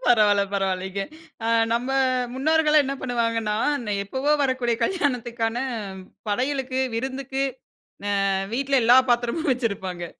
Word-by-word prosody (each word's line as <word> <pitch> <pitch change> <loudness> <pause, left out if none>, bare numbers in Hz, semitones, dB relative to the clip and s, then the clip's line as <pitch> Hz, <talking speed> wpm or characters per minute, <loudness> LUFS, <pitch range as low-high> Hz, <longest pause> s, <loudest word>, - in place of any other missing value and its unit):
பரவால்ல. 210 -4 +5
பரவால்லிங்க. 190 0 -1 0.4
அ, - - 0 0.3
நம்ம 240 +2 0 0.5
முன்னோர்கள்லாம் 305 +2 +3
என்ன 275 - -2
பண்ணுவாங்கன்னா, 230 -3 0 0.5
எப்பவோ 265 +8 0
வரக்கூடிய 255 -3 0
கல்யாணத்துக்கான 240 - -1 0.7
படையலுக்கு, 260 +3 -1
விருந்துக்கு, 265 +2 -3 0.7
அ, - - 0 0.4
வீட்ல 275 +1 +2
எல்லா 245 +3 +7
பாத்திரமும் 240 +6 +1
வச்சிருப்பாங்க. 190 -8 -3
245 Hz, 100 wpm, -24 LUFS, 225-270 Hz, 0.7 s, எல்லா